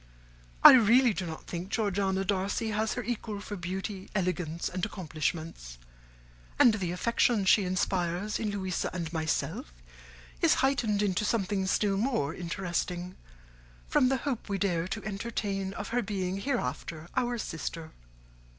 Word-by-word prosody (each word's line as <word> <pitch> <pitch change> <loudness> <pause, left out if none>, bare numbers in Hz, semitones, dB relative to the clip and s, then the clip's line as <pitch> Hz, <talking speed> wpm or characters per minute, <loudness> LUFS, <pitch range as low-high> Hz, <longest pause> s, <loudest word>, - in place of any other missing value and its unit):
I - - +13
really 240 0 +6
do 185 -2 -3
not 160 -1 -7
think 175 +2 -5
Georgiana 195 -3 0
Darcy 200 +3 0
has 215 +1 0
her 245 - -3
equal 220 -3 -4
for 205 +1 -6
beauty, 190 +2 -5
elegance, 180 -4 -1
and 185 0 -5
accomplishments; 160 - -3 0.8
and 235 - +7
the 185 -5 -2
affection 225 +2 +2
she 195 +1 +5
inspires 185 +1 -1
in 220 - -1
Louisa 190 -3 -2
and 170 -2 -4
myself 160 - -2 0.7
is - - +5
heightened 220 -7 +1
into 195 0 +1
something 205 -3 0
still 195 0 +2
more 200 - 0
interesting 180 0 -3 0.7
from 255 - +3
the 270 - +2
hope 260 -6 -3
we 200 - 0
dare 180 -3 0
to - - -5
entertain 195 -2 -3
of 205 - -5
her 245 +1 +1
being 195 -3 -2
hereafter 165 - -3
our 245 -1 +1
sister. 165 -4 -5
195 Hz, 140 wpm, -29 LUFS, 175-215 Hz, 0.8 s, I